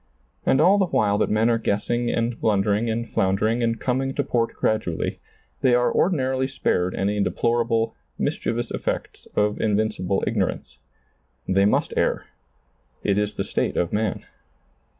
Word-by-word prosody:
And 135 - +4
all 190 +6 +5
the 190 - +2
while 105 - +1
that - - +1
men 110 +2 +2
are 115 -1 +2
guessing 120 +3 0
and 115 0 -1
blundering 105 +2 +1
and 115 +1 -2
floundering 105 +5 +1
and 115 -1 0
coming 135 +1 -1
to 145 - +1
port 120 -4 -1
gradually, 110 -7 -1 0.4
they 130 -3 +4
are 125 0 +2
ordinarily 130 -7 +1
spared 95 -8 0
any 100 +1 0
deplorable, 115 +1 0 0.2
mischievous 120 0 -2
effects - - -4
of 105 0 +1
invincible 105 -3 0
ignorance. - - -2 0.7
They 100 +1 +3
must 105 - +1
err. - - 0 0.8
It 100 0 +2
is 105 0 -2
the 95 - -1
state - - -1
of 85 - 0
man. 110 -1 -1
115 Hz, 150 wpm, -23 LUFS, 105-120 Hz, 0.8 s, all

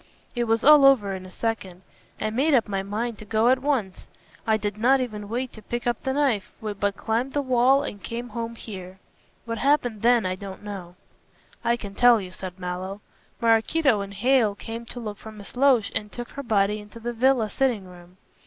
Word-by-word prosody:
It 240 -1 0
was 225 0 +1
all 300 -1 +8
over 240 -8 +5
in 185 -1 -7
a - - -12
second. 190 -3 -4 0.4
I 215 - -1
made 275 +6 +3
up 230 -3 +3
my 195 -2 -1
mind 215 +3 -3
to - - -8
go 220 +3 +2
at 260 0 +4
once. 255 -10 -1 0.4
I 220 -1 +4
did 205 0 -4
not 260 +4 +4
even 210 -5 -4
wait 250 +3 -3
to 220 - -11
pick 240 +3 -4
up 240 -2 0
the 265 - -1
knife, 265 -8 +1
but 205 -2 -2
climbed 235 +4 -1
the 290 - +1
wall 260 +2 +4
and 205 - -6
came 240 +4 -5
home 230 +1 -5
here. 190 -5 -9 0.5
What 230 -1 -4
happened 245 -6 +1
then 240 -2 +4
I 185 - 0
don't 195 +1 -8
know." 190 -4 -7 0.7
"I 235 - +2
can 200 -4 -8
tell 245 +1 +6
you," 185 -2 -7
said 185 -1 -8
Mallow. 185 +2 -5 0.4
"Maraquito 230 +2 +3
and 200 0 -7
Hale 235 -1 +3
came 230 +3 -7
to 245 - -7
look 210 -3 -6
for 220 - -10
Miss 210 +1 -9
Loach 250 -5 +4
and 210 -1 -2
took 240 -1 -7
her 280 - -6
body 210 -4 +1
into 210 +2 -12
the 240 +1 -4
villa 245 -1 +3
sitting 245 -8 0
room. 180 0 -15
225 Hz, 210 wpm, -25 LUFS, 200-245 Hz, 0.7 s, all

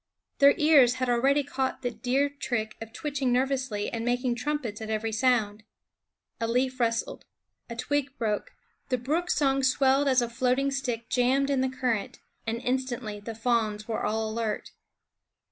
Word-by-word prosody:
Their 280 0 +7
ears 285 -6 +5
had 255 -1 -1
already 270 +4 +3
caught 265 -1 -3
the 245 - -1
deer 265 +4 +1
trick 245 -6 -3
of 225 0 -7
twitching 270 0 -2
nervously 255 -4 0
and 230 -1 -3
making 245 +1 0
trumpets 245 -4 -3
at 220 - -5
every 220 +1 -1
sound. 220 -3 +1 0.8
A 230 - -1
leaf 255 +2 0
rustled, 230 -1 -1 0.5
a 235 - -5
twig 280 +3 -2
broke, 215 -3 -2 0.4
the 255 - +1
brook's 315 +9 0
song 275 -2 +2
swelled 270 +1 +3
as 260 -2 +4
a - - -1
floating 255 +3 +1
stick 245 -4 -3
jammed 265 +3 +2
in 270 -2 +2
the 260 - +1
current, 250 -5 -2 0.3
and 230 +1 -1
instantly 245 -4 -2
the 225 +2 -7
fawns 220 -2 0
were 225 - -2
all 220 +1 0
alert. 220 -1 -3
250 Hz, 160 wpm, -27 LUFS, 230-270 Hz, 0.8 s, Their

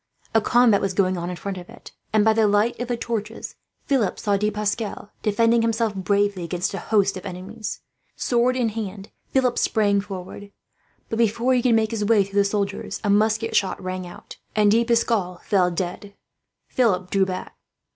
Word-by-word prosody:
A 225 - +4
combat 235 -2 +4
was 195 -2 -1
going 185 -1 +2
on 175 0 -4
in 180 - -4
front 190 +1 -5
of 175 - -12
it - - -13 0.2
and, 215 -1 +3
by 220 - +5
the 220 -1 +3
light 205 +3 +2
of 245 - -3
the 240 -1 -1
torches, 225 -1 -4 0.3
Philip 260 -8 +1
saw 205 -2 0
De 210 +2 +1
Pascal 210 0 -3
defending 230 +2 +3
himself 225 -1 0
bravely 200 -1 0
against 180 +3 -2
a 195 - -3
host 200 -3 +1
of 185 - -8
enemies. 200 +4 -6 0.3
Sword 245 +1 +1
in 245 -3 +1
hand, 205 -2 -6 0.2
Philip 255 -2 +1
sprang 205 -3 +2
forward. 200 0 -8 0.6
But 225 - -2
before 235 +3 +2
he 250 - +3
could 240 -2 +3
make 220 -1 +1
his 220 -2 -2
way 210 -1 +4
through 200 +1 -1
the 200 - +4
soldiers, 200 0 -2
a 205 - +2
musket 220 +2 +2
shot 195 - +1
rang 185 -1 -5
out, 175 - -12 0.2
and 210 -1 +4
De 230 +2 +4
Pascal 230 -6 0
fell 185 -3 +3
dead. 185 +3 -5 0.5
Philip 185 -8 +1
drew 195 -1 +2
back. 185 -1 -5
205 Hz, 190 wpm, -23 LUFS, 195-225 Hz, 0.6 s, by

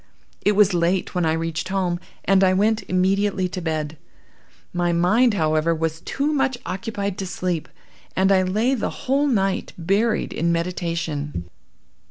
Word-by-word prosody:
"It 205 - +3
was 205 -1 +4
late 175 +2 +1
when 180 -3 +1
I 160 - +2
reached 165 +1 -2
home, 185 -3 0 0.3
and 195 +1 +4
I 185 0 +4
went 215 +3 +2
immediately 190 +1 +1
to 185 0 -5
bed. 155 -2 -3 0.7
My 175 -1 +1
mind, 210 +8 +3
however, 155 -1 +2
was 160 0 -2
too 290 +2 -1
much 270 -3 +1
occupied 200 +1 -3
to 190 - -3
sleep, 180 -3 -2 0.5
and 190 +1 +3
I 190 -1 +5
lay 215 +8 +1
the 250 - -1 0.2
whole 275 +3 +2
night 195 -7 0
buried 200 +6 +1
in 170 +2 0
meditation. 165 - -2
185 Hz, 155 wpm, -22 LUFS, 165-205 Hz, 0.7 s, I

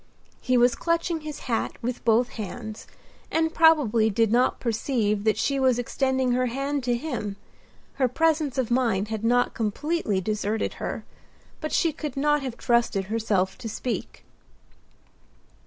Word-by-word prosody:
He 255 0 +2
was 245 0 +5
clutching 335 -1 -1
his 305 -1 -7
hat 230 -3 -1
with 245 +1 -3
both 235 +2 +3
hands, 220 0 -7 0.4
and 320 0 +1
probably 275 -10 +4
did 220 +1 +2
not 245 +2 +2
perceive 220 -3 0
that 215 -1 +3
she 275 +4 0
was 260 -2 +3
extending 260 +1 0
her 250 +1 +1
hand 275 +3 -2
to 240 -1 +1
him, 235 -8 -4 0.6
her 260 - +3
presence 305 +1 +1
of 250 -3 0
mind 225 -5 +1
had 220 -1 -4
not 245 +2 +2
completely 225 - -1
deserted 210 +2 -1
her; - - -4 0.5
but 310 - -4
she 330 -2 +2
could 295 -3 -6
not 295 +1 +2
have 255 -3 -5
trusted 235 -5 +1
herself 200 -4 0
to 225 - -5
speak. 240 +3 -4
245 Hz, 150 wpm, -25 LUFS, 220-280 Hz, 0.6 s, was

